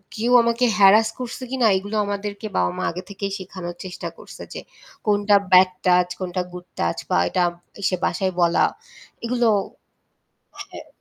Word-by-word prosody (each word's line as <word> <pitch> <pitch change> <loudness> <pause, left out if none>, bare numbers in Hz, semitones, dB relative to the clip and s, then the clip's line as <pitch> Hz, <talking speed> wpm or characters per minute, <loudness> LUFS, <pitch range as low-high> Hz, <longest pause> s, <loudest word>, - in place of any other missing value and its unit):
কেউ 230 +3 -1
আমাকে 235 +1 +1
হ্যারাস 210 +2 +6
করছে 250 0 -6
কিনা 255 -3 +2
এগুলো 205 +3 -5
আমাদেরকে 205 +1 -4
বাবা-মা 90 0 0
আগে 180 +2 -7
থেকেই 200 0 -4
শেখানোর 180 -2 -7
চেষ্টা 185 - -6
করছে - - -11
যে - - -6 0.4
কোনটা 205 -1 +3 0.2
ব্যাড 185 0 +7
টাচ 180 -1 +4
কোনটা 185 -1 -2
গুড 180 0 -9
টাচ 85 0 0
বা - - +2
এটা 180 - +1 0.4
এসে 195 -1 +1
বাসায় 185 +2 -1
বলা 170 0 +4 0.6
এগুলো 240 0 +1 1.2
হ্যাঁ, - - -11
195 Hz, 145 wpm, -22 LUFS, 180-215 Hz, 1.2 s, ব্যাড